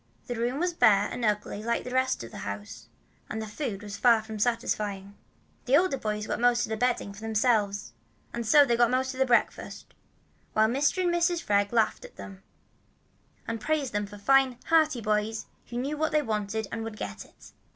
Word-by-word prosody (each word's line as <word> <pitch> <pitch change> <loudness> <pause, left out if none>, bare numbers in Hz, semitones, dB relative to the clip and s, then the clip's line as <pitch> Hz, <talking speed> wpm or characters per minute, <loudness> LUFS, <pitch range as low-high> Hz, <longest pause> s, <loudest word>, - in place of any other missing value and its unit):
The 245 - -4
room 240 +4 -2
was 355 +1 0
bare 205 -9 +4
and 245 - -5
ugly 210 -1 -1
like 235 +1 -1
the 250 - -7
rest 260 - +1
of 115 - -9
the - - -8
house, 100 0 -7 0.4
and 220 - -4
the 220 - -4
food 210 -2 -5
was 205 -1 -7
far 230 -3 +5
from 220 -1 -7
satisfying. 210 -4 -1 0.5
As - - -37
the 270 +3 +6
older 360 -5 +2
boys 210 -1 -2
got - - -3
most 240 0 +3
of - - -10
the - - 0
bedding 240 -3 -1
for 200 - -12
themselves, 210 - 0 0.5
so 285 +6 +6
they 240 -3 +2
got 240 0 +4
most 260 +1 0
of 260 - -9
the 265 - +3
breakfast, 240 -1 0 0.6
while 220 0 +4
Mr. 290 +9 +1
and 350 -1 +1
Mrs. 345 0 +1
Freg 200 -1 +2
laughed 230 - +1
at - - -12
them, 195 -2 -10 1.1
and 230 -1 -3
praised 295 -1 -1
them 205 0 -1
for 205 +1 -11
fine, 265 +3 +3
hearty 310 -6 +3
boys 215 +1 -1 0.2
who 240 - -6
knew 275 +5 -2
what 315 +1 0
they 305 -1 +2
wanted 215 -2 -2
and 225 -1 -4
would 225 -1 -6
get 100 - -6
it. - - -18
230 Hz, 205 wpm, -28 LUFS, 210-260 Hz, 1.1 s, the